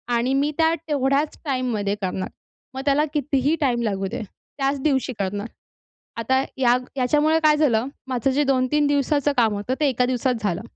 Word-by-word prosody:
आणि 245 +3 +1
मी 285 +2 +1
त्या 325 0 +3
तेवढ्याच 280 +1 0
टाईममध्ये 245 -7 -1
करणार. 185 0 -3 0.4
मग 265 - -4
त्याला 290 +2 +3
कितीही 290 +1 +1
टाइम 245 -4 +1
लागू 195 -3 -1
दे, 245 0 -4 0.4
त्याच 275 0 0
दिवशी 265 -3 0
करणार. 200 +3 -2 0.7
आता 260 +4 +1
या 250 -2 +4 0.2
याच्यामुळे 300 +5 +3
काय 300 -1 +5
झालं? 255 -5 +2 0.2
माझं 260 0 0
जे 290 +3 +2
2-3 275 +2 +2
दिवसाचं 285 0 +1
काम 225 -3 +3
होतं, 205 +6 -2
ते 295 - +3
1 250 -1 +1
दिवसात 255 0 0
झालं. 190 -1 -1
265 Hz, 165 wpm, -23 LUFS, 240-290 Hz, 0.7 s, काय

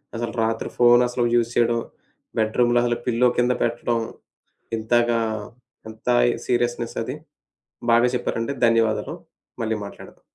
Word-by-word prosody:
అసలు 115 0 -3
రాత్రి 110 0 -2
ఫోను 120 0 +6
అసలు 125 0 -1
యూజ్ 115 0 +2
చేయడం 120 0 +2 0.6
బెడ్రూమ్‌లో 120 +2 +2
అసలు 120 -1 0
పిల్లో 125 0 +3
కింద 125 +1 +3
పెట్టడం 120 0 0 0.8
ఇంతగా 120 +1 +1 0.7
ఎంత 110 +2 -10 0.4
సీరియస్నెస్ 120 -1 -1
అది! 130 +5 -5 0.8
బాగా 120 +1 +5
చెప్పారండి 120 +2 -2
ధన్యవాదాలు. 115 -1 +1 0.5
మళ్ళీ 110 0 -1
మాట్లాడదాం. - - -12
120 Hz, 115 wpm, -23 LUFS, 115-120 Hz, 0.8 s, ఫోను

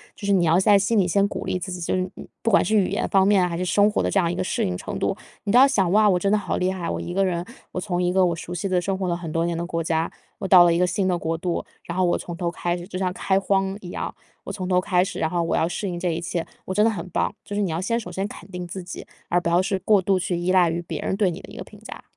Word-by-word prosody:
就 205 - -8
是 200 - +1
你 185 -3 +3
要 165 +2 +4
在 200 +1 +5
心 210 +3 +1
里 190 -3 +3
先 200 +3 +2
鼓 - - -5
励 185 - -1
自 185 +1 -5
己， 180 - -5
就 170 - -1
是， 185 - +1
呃， - - -9 0.2
不 230 - +1
管 200 - +4
是 220 - +1
语 200 -3 +4
言 205 +4 -1
方 195 -1 +4
面， 195 -3 +4
还 170 - -4
是 180 - -2
生 205 +4 +3
活 - - 0
的 - - 0
这 200 - +2
样 170 -2 +1
一 - - -3
个 180 - -1
适 - - -1
应 90 - -2
程 - - -5
度， - - 0 0.3
你 200 - -1
都 245 - +6
要 270 - +8
想： 190 -9 +1
哇， 210 +1 +5
我 180 - +3
真 195 +3 0
的 - - +5
好 205 - -2
厉 185 +1 +1
害。 180 -3 -4
我 - - -2
一 175 - -5
个 195 +1 +2
人， 175 -2 -1 0.3
我 185 - -2
从 180 -2 -2
一 180 0 +1
个 190 0 +4
我 170 -1 0
熟 170 - -8
悉 180 +3 -2
的 180 -1 +1
生 195 +2 -2
活 190 -1 -2
了 175 - 0
很 170 -2 -6
多 165 +1 0
年 170 -1 -1
的 170 - -2
国 165 -1 -2
家， 160 0 0 0.3
我 195 - -3
到 185 -2 +8
了 170 -1 +4
一 170 - +1
个 180 - +3
新 190 +1 0
的 180 - +2
国 165 0 -2
度， 175 0 -2 0.2
然 170 - -6
后 185 - +2
我 175 - +2
从 175 - -7
头 170 0 -2
开 175 0 -2
始， 175 0 -8
就 185 - -6
像 185 -1 -1
开 190 +1 +1
荒 195 0 0
一 180 - -8
样， - - -4 0.3
我 - - -5
从 185 -3 -4
头 180 -1 +3
开 180 -1 +2
始， 200 - -6
然 160 - 0
后 175 -1 0
我 165 - 0
要 165 - +1
适 200 +3 -3
应 175 -1 -4
这 180 - -1
一 165 0 -1
切， 170 -1 -3 0.2
我 185 - -3
真 210 - +3
的 225 - +5
很 210 -4 -4
棒。 205 - -1
就 205 - -6
是 205 - 0
你 195 - 0
要 160 +1 -2
先 230 +5 0
首 180 -5 -8
先 195 +3 -2
肯 205 - -12
定 180 -1 -6
自 185 +1 -6
己， 180 - -8 0.2
而 175 - +3
不 170 - -2
要 175 +2 +4
是 195 0 -1
过 200 +1 +3
度 190 +1 +2
去 180 0 -1
依 175 +1 0
赖 180 -3 +4
于 170 +1 -2
别 170 - -6
人 - - -1
对 195 -2 +2
你 170 - -5
的 - - -12
一 - - -11
个 - - -6
评 - - -16
价。 - - -10
180 Hz, 375 characters per minute, -23 LUFS, 175-195 Hz, 0.3 s, 要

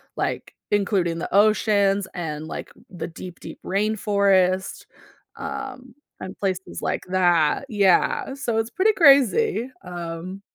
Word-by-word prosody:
like, - - -3 0.2
including 195 -5 +1
the - - -5
oceans 200 -2 +3
and, 155 -3 -5
like, - - -6 0.2
the 180 - -6
deep, 175 +1 -10
deep - - -10
rainforest, 195 -2 +1 0.5
um, 265 -2 -7 0.2
and 185 - -8
places 190 -2 -3
like - - -2
that, 175 - +2
yeah, 200 +4 +2
so 240 -5 -2
it's 225 0 -1
pretty 400 - +2
crazy, 280 - +4
um 175 +1 -7
200 Hz, 120 wpm, -23 LUFS, 180-230 Hz, 0.5 s, crazy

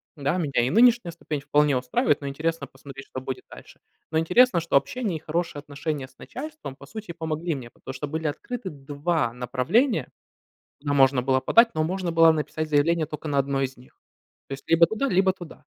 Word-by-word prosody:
Да, 145 +3 -1
меня 145 -8 +1
и 120 - +1
нынешняя 235 - +4
ступень 160 -3 -5
вполне 145 -1 +2
устраивает, 125 +3 +1
но 140 - -5
интересно 155 +1 -2
посмотреть, 135 0 -12
что 130 - -6
будет 130 -1 -6
дальше. - - -14 0.3
Но 160 - +1
интересно, 180 +5 +4
что 170 - -2
общение 210 - -2
и - - -10
хорошие 165 -1 -3
отношения 145 0 -4
с 130 0 -27
начальством 300 - -8
по - - -13
сути 215 -4 -7
помогли 160 0 -3
мне, 120 -3 -8
потому 130 - -10
что 135 +3 -5
были 160 +2 -4
открыты 210 +7 -5
2 145 -1 -2
направления, 135 - +1 0.7
куда 145 -1 -1
можно 135 -2 +4
было 130 +1 +2
подать, 230 - +4
но 155 0 +1
можно 180 +1 -2
было 165 0 +6
написать 155 0 -3
заявление 155 +2 +2
тока 155 +1 -7
на 140 -1 +1
1 135 0 0
из 135 0 -3
них. 125 - -20 0.5
То 135 - -4
есть 135 - -11
либо 165 0 +6
туда, 220 +8 -1
либо 190 -1 +3
туда. 175 -3 -12
155 Hz, 200 wpm, -25 LUFS, 140-175 Hz, 0.7 s, было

